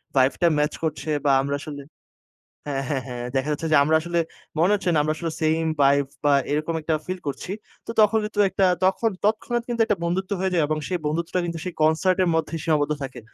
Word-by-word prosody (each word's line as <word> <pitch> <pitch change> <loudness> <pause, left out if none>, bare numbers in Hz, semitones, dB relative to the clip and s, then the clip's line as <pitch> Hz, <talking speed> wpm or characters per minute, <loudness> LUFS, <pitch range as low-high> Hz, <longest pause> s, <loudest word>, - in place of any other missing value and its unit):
Vibe 130 0 +4
টা 175 - +5
match 150 +1 +1
করছে, 155 0 -2 0.2
বা 140 - +5
আমরা 140 +1 -1
আসলে 145 -1 -7 0.9
হ্যাঁ, 135 -1 -2
হ্যাঁ, 135 -3 -1
হ্যাঁ, 120 -1 -5
দেখা 135 +3 0
যাচ্ছে, 155 +2 -2
যে, - - +6
আমরা 155 +2 +3
আসলে 170 +1 -1 0.4
মনে 175 +5 +4
হচ্ছে 195 -3 0
না - - +3
আমরা 155 +1 0
আসলে 165 +1 -3
সেইম 160 +1 +2 0.2
ভাইব, 140 0 +4 0.2
বা 145 - +4 0.2
এরকম 155 +3 -1
একটা 160 +1 -1
ফিল 185 0 -4
করছি। 140 +6 -4 0.3
তো - - -4
তখন 215 +1 +4
কিন্তু 210 0 -5
একটা 195 - +2 0.2
তখ 190 +1 +5 0.3
তৎক্ষণাৎ 230 +3 0
কিন্তু 235 -1 0
একটা 210 -3 0
বন্ধুত্ব 185 +3 -2
হয়ে 190 0 0
যায়, 170 -3 +3
এবং 155 0 -1
সেই 180 -1 -1
বন্ধুত্বটা 165 +4 -1
কিন্তু 170 -1 -4
সেই 180 - -4
কনসার্ট 160 +4 +3
এর 180 - +1
মধ্যেই 160 0 -1
সীমাবদ্ধ 150 -2 +1
থাকে। 130 -2 -6
160 Hz, 215 wpm, -24 LUFS, 145-185 Hz, 0.9 s, যে